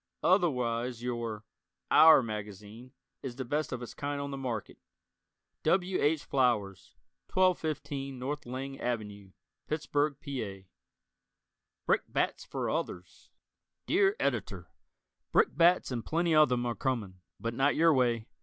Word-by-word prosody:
Otherwise 125 - +1
your 115 -3 -4 0.5
"our" 160 -4 +8
magazine 105 +2 -7 0.3
is 130 -3 -6
the 130 0 -5
best 150 +5 -1
of 125 -1 -4
its 120 - -8
kind 145 0 -3
on 140 0 -4
the - - -4
market 125 -6 -5 0.8
W. 185 0 +1
H. 150 +1 +2
Flowers. 115 -8 0 0.4
1215 155 -7 0
N. 145 +3 -2
Lang 135 +1 -5
Ave., 105 -5 -4 0.3
Pittsburgh, 150 -1 0
Pa. 110 - -6 1.2
Brickbats - - 0
for - - -4
Others 90 0 -4 0.6
Dear 390 +3 +3
Editor: - - -2 0.6
Brickbats 175 - +3
and 120 -3 -3
plenty 165 +4 0
of 155 -1 +6
them 125 -1 0
are 120 - 0
coming, 110 -9 -3 0.2
but 115 0 -3
not 135 +4 +2
your 165 0 +5
way. 120 -4 +1
130 Hz, 125 wpm, -30 LUFS, 115-150 Hz, 1.2 s, our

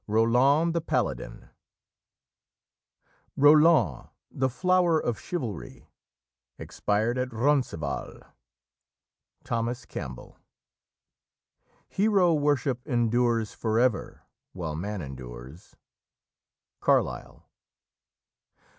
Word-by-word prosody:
ROLAND 125 +9 +3
THE 170 - 0
PALADIN - - -3 1.9
"Roland, 150 - +4 0.2
the 130 0 0
flower 180 +3 +2
of 120 -6 -2
chivalry, 125 - -6 0.7
Expired 110 +4 -1
at 125 0 -1
Roncevall." 110 - -1 1.2
Thomas 120 +1 -3
Campbell. 65 -1 -8 1.5
"Hero 195 -4 +2
worship 145 -4 0
endures 120 -2 +1
for 110 -1 -1
ever 125 -5 0 0.3
while 80 -4 -5
man 100 +3 -4
endures." 65 +3 -10 1.0
Carlyle. - - -1
120 Hz, 70 wpm, -27 LUFS, 105-145 Hz, 1.9 s, Roland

